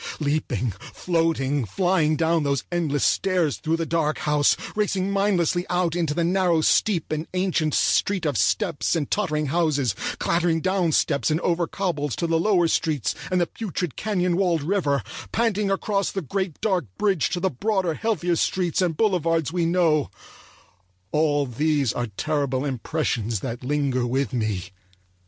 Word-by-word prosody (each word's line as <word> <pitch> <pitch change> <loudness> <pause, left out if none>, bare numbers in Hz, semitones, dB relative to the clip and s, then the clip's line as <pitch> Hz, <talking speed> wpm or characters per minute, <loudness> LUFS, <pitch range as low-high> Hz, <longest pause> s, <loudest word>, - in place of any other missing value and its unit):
Leaping, 140 -6 -1 0.2
floating, 165 -6 0
flying 165 - +1
down 165 +1 +2
those 140 -2 0
endless 160 -5 0
stairs 180 -6 +1
through 160 +1 -1
the 165 - -2
dark 160 -2 0
house; 150 -1 +2 0.2
racing 195 -2 0
mindlessly 185 -3 +1
out 175 -2 0
into 165 -4 -1
the 170 - +1
narrow, 175 -1 +2
steep, 170 +1 +2
and 155 +1 -2
ancient 175 -5 +1
street 190 -4 +2
of 145 -3 0
steps 155 - +1
and 150 -4 -2
tottering 155 -7 0
houses; 145 - +1 0.2
clattering 170 -1 +1
down 185 -1 +1
steps 140 -4 +1
and 155 +1 +1
over 170 -1 0
cobbles 150 -8 -2
to - - -2
the 165 -1 +1
lower 180 -2 +3
streets 150 -8 0 0.2
and 185 - +2
the 175 - +3
putrid 180 - -4
canyon 180 -5 0
walled 175 -6 +1
river; 150 -5 0 0.3
panting 210 -3 +1
across 195 0 0
the 195 - -3
great 190 +1 -3
dark 185 -8 +1
bridge 195 -7 +1
to 180 - -2
the 190 +1 0
broader, 190 - 0
healthier 180 -3 0
streets 180 +1 0
and 170 -4 0
boulevards 165 - +1
we 175 -2 +1
know; 165 -4 +2 1.0
all 150 -2 +2
these 140 0 0
are 120 - -2
terrible 140 -3 -1
impressions 120 - -2
that 120 -1 -5
linger 135 -2 0
with 130 -1 -1
me. 105 -6 -2
165 Hz, 155 wpm, -24 LUFS, 145-185 Hz, 1.0 s, lower